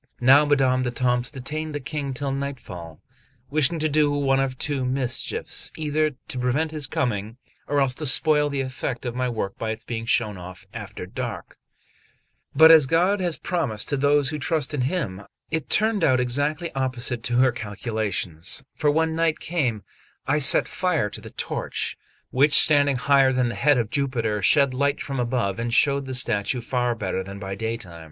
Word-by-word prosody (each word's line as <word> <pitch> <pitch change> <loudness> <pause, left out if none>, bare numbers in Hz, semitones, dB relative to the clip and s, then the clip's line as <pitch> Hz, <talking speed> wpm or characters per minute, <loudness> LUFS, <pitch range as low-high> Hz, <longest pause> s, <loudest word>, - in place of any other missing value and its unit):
Now 135 +4 +6
Madame 135 -3 +2
d'Etampes 125 0 0
detained 150 +3 -5
the - - -2
King 140 0 -4
till 140 +1 -3
nightfall, 120 - -6 0.5
wishing 155 +2 +1
to 155 0 +1
do 150 0 +2
one 140 -2 +1
of 135 -1 -1
two 140 -2 -2
mischiefs, 130 -1 -2
either 155 -1 0
to 130 - -3
prevent 135 +6 0
his 150 -4 -4
coming, 110 -3 -2 0.3
or 145 0 +1
else 135 -2 +2
to 150 +3 -4
spoil 150 +2 +3
the 140 -1 -2
effect 130 -1 -4
of 120 - -3
my 125 0 -1
work 110 -4 -4
by 110 - -3
its 110 0 -5
being 115 -1 -5
shown 105 -6 0
off 90 +2 -10
after 105 -5 -7
dark; 90 - -6 1.0
but 160 +1 +8
as 155 -4 +7
God 180 +7 +2
has 175 -3 0
promised 150 - -2
to 145 - 0
those 145 0 +2
who 150 -1 -4
trust 155 +1 -1
in 145 - -1
Him, 125 - -2 0.3
it 160 -1 -2
turned 215 -3 +2
out 130 -4 +4
exactly 145 +7 -1
opposite 130 -2 -2
to 120 0 0
her 130 0 +4
calculations; 105 -4 -3
for 150 - 0
when 160 +2 +1
night 165 -1 +1
came, 130 - -2 0.4
I 145 +2 +1
set 135 - +5
fire 165 - 0
to - - -8
the - - -10
torch, - - -3 0.4
which 145 +3 +4
standing 145 -3 +6
higher 135 +1 +3
than 125 -2 +1
the - - -4
head 140 +7 +3
of 115 -3 -1
Jupiter, 115 -7 -1
shed 140 +7 +4
light 140 +2 0
from 135 -2 -4
above 120 -4 -1
and 120 0 -2
showed 140 +2 +3
the 130 - -4
statue 120 0 0
far 125 0 -1
better 95 -3 -3
than 100 +1 -9
by 95 -1 -6
daytime. 105 -5 -5
130 Hz, 185 wpm, -24 LUFS, 115-145 Hz, 1.0 s, but